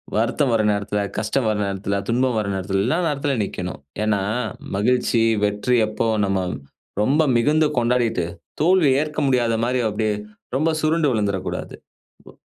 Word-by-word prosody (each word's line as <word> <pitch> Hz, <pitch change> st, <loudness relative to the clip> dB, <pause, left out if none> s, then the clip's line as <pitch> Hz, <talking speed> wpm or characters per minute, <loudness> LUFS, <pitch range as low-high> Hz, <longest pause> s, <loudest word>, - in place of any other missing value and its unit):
வருத்தம் 120 Hz, +5 st, +1 dB
வர 115 Hz, -, +3 dB
நேரத்துல, 100 Hz, 0 st, -1 dB, 0.2 s
கஷ்டம் 110 Hz, +3 st, 0 dB
வர 105 Hz, -, 0 dB
நேரத்துல, 100 Hz, 0 st, -2 dB
துன்பம் 125 Hz, +1 st, +1 dB
வர 105 Hz, -, -2 dB
நேரத்துல்லாம் 95 Hz, +1 st, -1 dB
எல்லா 160 Hz, +7 st, +1 dB
நேரத்துல 145 Hz, -2 st, -1 dB
நிக்கணும். 90 Hz, -2 st, -5 dB, 0.2 s
ஏனா 105 Hz, -2 st, +1 dB, 0.5 s
மகிழ்ச்சி, 120 Hz, +2 st, +2 dB, 0.2 s
வெற்றி 105 Hz, +4 st, 0 dB
எப்போ 110 Hz, +1 st, -1 dB, 0.2 s
நம்ம 95 Hz, -1 st, 0 dB, 0.6 s
ரொம்ப 140 Hz, +8 st, +3 dB, 0.2 s
மிகுந்து 150 Hz, +6 st, +3 dB
கொண்டாடிட்டு, 120 Hz, -6 st, +1 dB, 0.4 s
தோல்விய 155 Hz, -6 st, +4 dB
ஏற்க 150 Hz, 0 st, -3 dB
முடியாத 120 Hz, -3 st, +2 dB
மாரி 125 Hz, +1 st, 0 dB
அப்டியே 105 Hz, 0 st, -1 dB, 0.4 s
ரொம்ப 155 Hz, +5 st, +2 dB
சுருண்டு 155 Hz, -1 st, +2 dB
விழுந்துறக்கூடாது. 95 Hz, -5 st, -2 dB, 0.5 s
தோ -, -, -13 dB
115 Hz, 140 wpm, -22 LUFS, 105-135 Hz, 0.6 s, தோல்விய